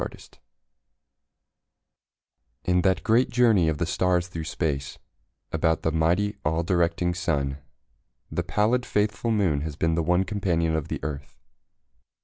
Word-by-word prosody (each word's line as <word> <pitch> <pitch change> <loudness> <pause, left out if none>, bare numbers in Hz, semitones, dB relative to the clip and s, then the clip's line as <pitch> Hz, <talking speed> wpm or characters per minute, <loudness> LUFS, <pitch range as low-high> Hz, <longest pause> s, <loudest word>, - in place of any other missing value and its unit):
A - - 0
SOLAR - - -1
ECLIPSE - - -15 2.3
In 90 0 +2
that 95 +1 +1
great 120 +3 +3
journey 115 -8 +4
of 80 - -1
the 85 - 0
stars 90 0 +1
through 80 -3 -5
space 70 -6 -3 0.5
About 80 0 +1
the 80 - +1
mighty, 85 +6 +1
all 80 +3 0
directing 85 0 +1
Sun, 70 -6 -1 0.7
The - - -1
pallid, 115 +4 +1
faithful 105 0 -1
Moon 95 -10 +1
has 75 -1 -4
been 80 +2 0
the 85 - +1
one 90 +3 +2
Companion 85 -5 0
of 80 -1 -2
the - - -4
Earth. 70 -1 -6
85 Hz, 145 wpm, -25 LUFS, 80-100 Hz, 2.3 s, journey